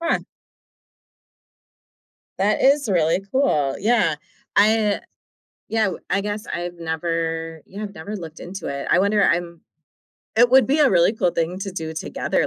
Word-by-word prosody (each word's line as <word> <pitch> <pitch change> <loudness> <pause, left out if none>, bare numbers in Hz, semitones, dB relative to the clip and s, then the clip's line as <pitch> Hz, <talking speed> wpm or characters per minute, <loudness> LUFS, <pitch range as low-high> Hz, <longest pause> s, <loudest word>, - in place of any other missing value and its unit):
Huh. 335 0 +1 2.2
That 205 +2 +2
is 275 -1 +4
really 170 -2 +2
cool, 150 - +1
yeah. 215 -7 +2 0.4
I 210 0 +3 0.7
yeah, 220 -1 +1
w 190 - -2
I 200 - +2
guess 210 +1 -4
I've 175 0 -4
never 165 -1 -3
yeah, 205 +3 -9
I've 200 - -8
never 200 +7 -6
looked 165 -3 -9
into 190 +3 -7
it, 140 0 -4
I 170 - +5
wonder 200 +1 +3
I'm 170 -2 0 0.7
it 240 +2 +5
would 260 +1 +6
be 290 +3 +2
a 280 - +5
really 175 +2 +4
cool 185 -6 +1
thing 170 +3 -2
to 195 - -4
do 160 -3 -5
together, - - -1
190 Hz, 155 wpm, -22 LUFS, 165-215 Hz, 2.2 s, would